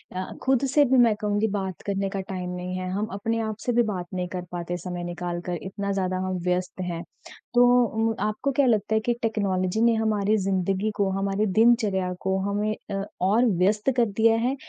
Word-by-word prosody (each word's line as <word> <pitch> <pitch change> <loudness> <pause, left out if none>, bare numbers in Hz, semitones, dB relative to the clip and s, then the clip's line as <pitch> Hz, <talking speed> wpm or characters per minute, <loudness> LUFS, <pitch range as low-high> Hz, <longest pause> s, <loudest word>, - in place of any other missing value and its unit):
अ, 185 - -2 0.2
खुद 265 0 +2
से 290 -1 +6
भी 265 +1 +3
मैं 235 -3 +5
कहूँगी 210 +1 +1
बात 190 -3 -3
करने 195 -1 -1
का 195 0 -3
टाइम 185 -1 -5
नहीं 180 0 -4
है। 185 0 -4
हम 205 +3 -1
अपने 225 +3 -1
आप 220 -1 -3
से 245 - +1
भी 240 0 +4
बात 190 -5 -3
नहीं 180 -1 -2
कर 180 0 -5
पाते 175 0 -3
समय 180 -1 -5
निकाल 175 0 -4
कर 175 -1 -2
इतना 200 +1 -4
ज़्यादा 185 -1 -1
हम 185 -1 -2
व्यस्त 180 +1 -1
हैं 175 -1 -4 0.5
तो 245 0 +6 0.5
उ 225 - -4
आपको 245 +6 -2
क्या 275 +1 +2
लगता 220 -3 +1
है 220 - +4
कि 240 - +2
टेक्नोलॉजी 200 -3 0
ने 235 0 +5
हमारी 215 -1 +1
ज़िंदगी 195 +1 0
को, 200 -1 +1
हमारी 195 +2 0
दिनचर्या 210 -3 +3
को 190 0 0
हमें 210 +1 -1 0.2
अ, 195 0 -2 0.2
और 210 +7 +3
व्यस्त 210 +6 +2
कर 240 - +5
दिया 225 0 +5
है 250 +4 0
200 Hz, 210 wpm, -25 LUFS, 185-220 Hz, 0.5 s, से